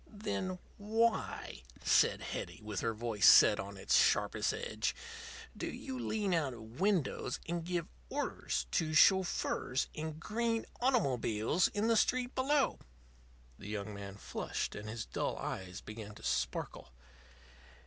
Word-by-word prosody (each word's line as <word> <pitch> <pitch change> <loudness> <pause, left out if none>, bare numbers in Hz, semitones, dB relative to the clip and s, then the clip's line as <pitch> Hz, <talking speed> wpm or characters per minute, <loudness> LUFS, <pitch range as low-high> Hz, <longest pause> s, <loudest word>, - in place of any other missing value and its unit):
"Then 190 -3 -3 0.2
why," 220 - 0 0.2
said - - +4
Hetty, - - -5
with 105 -2 -3
her 115 -1 -1
voice 110 -3 +2
set 105 - +8
on 100 0 -6
its - - +1
sharpest - - +3
edge, - - -2 0.6
"do - - -4
you 130 -1 -5
lean 195 - -1
out 145 -7 0
of 115 +3 -12
windows 185 -10 +1
and 170 0 -2
give 175 -1 -2 0.2
orders - - -2
to 155 -1 0
chauffeurs 180 -7 +3
in 155 0 -5
green 230 +5 -1
automobiles 140 - +2
in 210 +1 -1
the 230 - +4
street 250 +3 +2
below?" 275 +2 +2 0.8
The 100 - -8
young 105 0 -4
man 100 -1 -7
flushed, - - -4
and 105 +1 -7
his 110 0 -4
dull - - -2
eyes 95 +1 -5
began 105 -1 -8
to - - -13
sparkle. 60 -1 -2
145 Hz, 140 wpm, -34 LUFS, -, 0.8 s, set